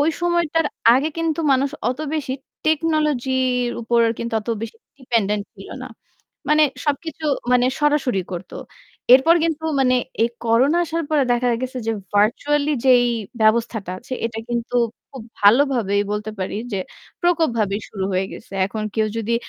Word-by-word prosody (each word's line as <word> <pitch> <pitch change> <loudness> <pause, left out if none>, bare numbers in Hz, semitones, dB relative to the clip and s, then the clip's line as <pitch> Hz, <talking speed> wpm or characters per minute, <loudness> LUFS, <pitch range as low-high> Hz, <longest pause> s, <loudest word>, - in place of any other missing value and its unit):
ওই 300 +3 +3
সময়টার 340 -2 +1 0.3
আগে 275 +5 +2
কিন্তু 330 0 -1
মানুষ 270 +1 +1 0.2
অত 255 - -5 0.2
বেশি 270 -4 -2 0.3
টেকনোলজির 265 -6 +1
উপর 235 +1 +2 0.2
কিন্তু 235 -1 -4
অত 210 - -14
বেশি 225 - -6 0.2
ডিপেন্ডেন্ট 210 -5 0
ছিল 195 -1 -12 0.2
না। 260 - -8 0.6
মানে 305 +1 +5 0.2
সবকিছু 310 +2 -3 0.3
মানে 250 0 +4
সরাসরি 290 -9 +1
করত। 180 +1 -7 0.6
এরপর 270 +6 +6
কিন্তু 320 -1 -2 0.2
মানে 255 -1 +3 0.3
এই 230 - +3 0.2
করোনা 255 +9 +3
আসার 330 0 -3
পরে 290 -3 +3
দেখা 245 +1 +1
গেছে 255 0 -4
যে - - +2 0.2
ভার্চুয়ালি 285 +8 +2
যেই 245 -2 +6 0.4
ব্যবস্থাটা 220 -3 +1
আছে 255 - -12
এটা 225 -1 -6
কিন্তু 240 +1 -3 0.4
খুব 265 -4 -9 0.2
ভালোভাবেই 220 -2 +4
বলতে 210 +1 -3
পারি 185 +2 -3 0.2
যে 195 - -1 0.4
প্রকোপভাবে 240 - +1
শুরু 195 -2 -4
হয়ে 185 +1 0
গেছে। - - -12
এখন 215 +2 -5
কেউ 220 -1 +1
যদি 225 +1 -1
250 Hz, 150 wpm, -21 LUFS, 220-295 Hz, 0.6 s, এরপর